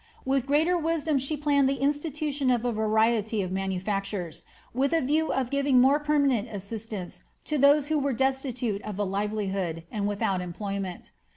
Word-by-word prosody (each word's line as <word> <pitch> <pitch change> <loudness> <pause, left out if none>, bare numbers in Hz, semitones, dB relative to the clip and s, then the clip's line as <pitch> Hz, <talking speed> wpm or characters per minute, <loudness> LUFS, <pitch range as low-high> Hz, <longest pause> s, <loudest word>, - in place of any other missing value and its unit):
With 270 -1 +1
greater 310 +5 +3
wisdom 320 -3 0
she 275 +4 -2
planned 285 -2 +3
the 275 - +1
institution 290 0 -1
of 245 -1 +1
a 245 - +1
variety 220 -1 +1
of 185 - -5
manufactures, 190 -2 -3 0.3
with 275 +5 +1
a 330 - +3
view 305 +4 +1
of 255 -2 -1
giving 280 -2 +3
more 270 +4 +5
permanent 280 -6 +1
assistance 205 -1 -6 0.2
to 300 -1 -1
those 285 +1 +5
who 310 -1 +2
were 280 0 0
destitute 255 -4 -1
of 210 -2 -6
a 205 - 0
livelihood, 195 -4 -2
and 205 -1 -1
without 200 -2 0
employment. 190 +1 -5
245 Hz, 165 wpm, -27 LUFS, 205-280 Hz, 0.3 s, more